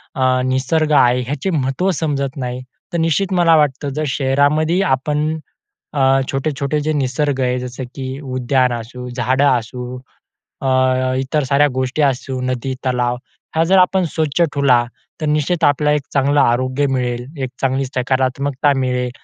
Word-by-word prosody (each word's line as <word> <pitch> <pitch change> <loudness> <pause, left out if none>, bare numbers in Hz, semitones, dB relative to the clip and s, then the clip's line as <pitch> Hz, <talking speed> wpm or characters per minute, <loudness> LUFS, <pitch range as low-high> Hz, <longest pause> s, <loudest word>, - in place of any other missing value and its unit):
अ, 130 -1 +2
निसर्ग 135 +5 0
आहे 125 +1 +4
ह्याचे 145 +8 -3
महत्त्व 150 +3 0
समजत 140 -5 -2
नाही. 125 -1 -4 0.3
तर 170 - 0
निश्चित 170 +4 +1
मला 170 -2 +4
वाटतं 145 -1 +1
जर 155 - -1
शहरामध्ये 145 +6 +2
आपण 150 +3 0 0.7
अ, 145 - -1 0.3
छोटे-छोटे 140 +1 -1
जे 155 +1 -1
निसर्ग 140 0 -1
आहे 125 0 +1
जसं 125 +1 -6
की 130 -1 -5
उद्यान 130 -1 0
असू 125 +2 -6
झाडं 130 +2 +1
असू 125 +2 -7 0.6
अ, - - -3 0.5
इतर 135 +3 -1
साऱ्या 140 +2 +3
गोष्टी 130 +3 -1
असू. 130 -1 0
नदी 130 +1 -2
तलाव 125 -1 0 0.4
हा 160 - +4
जर 190 +3 +4
आपण 185 0 +3
स्वच्छ 155 0 -1
ठेवला 140 -6 +3 0.4
तर 155 - -2
निश्चित 150 +3 +1
आपल्याला 150 +1 +3
एक 145 - -3
चांगलं 140 +1 +2
आरोग्य 130 +4 +2
मिळेल. 125 -2 -2 0.2
एक 130 - -3
चांगली 135 0 0
सकारात्मकता 130 +2 0
मिळेल, 125 -1 -1
135 Hz, 150 wpm, -18 LUFS, 130-150 Hz, 0.7 s, आहे